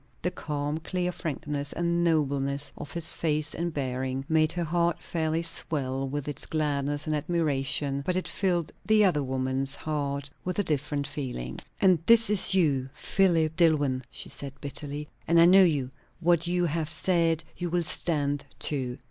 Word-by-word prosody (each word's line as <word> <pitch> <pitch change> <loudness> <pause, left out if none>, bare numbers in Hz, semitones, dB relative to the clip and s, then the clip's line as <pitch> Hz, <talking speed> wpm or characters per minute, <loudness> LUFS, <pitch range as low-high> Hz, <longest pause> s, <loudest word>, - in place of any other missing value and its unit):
The - - +1
calm, 145 +1 -3
clear 180 +2 -2
frankness 150 -4 -4
and 170 0 0
nobleness 140 -3 +1
of 145 - -8
his 170 +1 +2
face 155 -2 -1
and 170 +1 -2
bearing 130 -2 -3
made 155 0 +3
her 175 0 -1
heart 170 +1 0
fairly 160 0 -1
swell 135 -5 0
with 145 +1 -4
its 145 -1 -4
gladness 145 -2 -1
and 155 -1 0
admiration; 145 -3 -1
but 180 +4 0
it 185 - -1
filled 175 -5 0
the 215 -1 +4
other 170 -6 +2
woman's 130 +1 -2
heart 140 -2 -3 0.2
with 180 - -3
a 205 - +2
different 145 -2 -1
feeling. 125 - -5 0.2
"And 185 -3 +4
this 230 -2 +6
is 195 -2 +5
you, 140 -8 +2
Philip 165 -5 +2
Dillwyn!" 145 -7 +2
she - - -6
said 140 -1 -5
bitterly. 145 +1 -4 0.2
"And 170 +1 +4
I 165 - +8
know 190 +3 +8
you; 145 -8 +2 0.3
what 170 0 +2
you 175 0 +1
have 160 -1 -1
said 170 -3 +1
you 175 -1 -3
will 175 0 0
stand 145 -3 -1 0.2
to. 130 -4 -1
155 Hz, 165 wpm, -27 LUFS, 140-170 Hz, 0.3 s, I